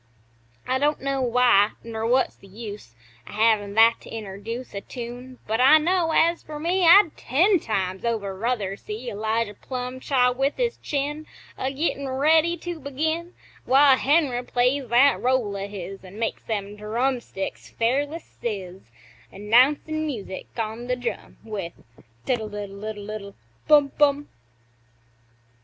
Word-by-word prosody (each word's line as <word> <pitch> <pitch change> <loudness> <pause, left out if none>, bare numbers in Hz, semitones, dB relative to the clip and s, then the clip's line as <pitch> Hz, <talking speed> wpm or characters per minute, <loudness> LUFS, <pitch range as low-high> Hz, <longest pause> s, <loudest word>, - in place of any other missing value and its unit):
I 260 +1 +1
don't 295 +2 +1
know 275 -1 -1
why, 240 -4 +4
ner 225 -1 -4
what's 255 +2 +2
the 195 - -18
use 205 - -9 0.3
O' - - -10
havin' 210 -2 +2
that 225 +1 +5
to - - -13
interduce 220 +3 -7
A 200 - -4
tune 245 +3 -8
but 220 +3 0
I 280 +5 +8
know, 340 +2 +1
as 335 +2 +3
fer 305 -1 -8
me 350 +3 +1
I'd 355 -1 +7
ten 350 - +2
times 190 -6 -2
over 215 -5 -2
ruther 210 -2 -2
see 220 +5 -6
Elijah 220 +1 -1
Plumb 250 +3 -6
chaw 255 -2 +2
with 270 +3 -1
his 485 -1 -1
chin, 295 +2 -3 0.3
A 260 - -2
gettin' 280 -1 -2
ready 315 +5 +3
to 345 0 -6
begin, 315 +5 -3 0.3
While 270 +1 +6
Henry 270 -3 +2
plays 250 +2 0
that 255 +4 +4
roll 245 -5 +1
o' 195 0 -4
his 195 -1 -8
An' 190 +2 -12
makes 225 0 -2
them 205 -2 -3
drumsticks 230 -1 -3
fairly 280 +7 0 0.2
sizz, 190 -5 -4 0.5
Announcin' 270 +9 +2
music, 210 -9 -6
on 225 +2 -4
th' 250 0 -1
drum, 245 - -5
With 205 -6 -5 0.5
"Tiddle 225 -4 -1
iddle 200 -1 -7
iddle 210 -2 -6
iddle 200 -2 -7 0.3
Bum 290 -2 +5
Bum!" 290 0 +3
245 Hz, 145 wpm, -24 LUFS, 210-285 Hz, 0.5 s, I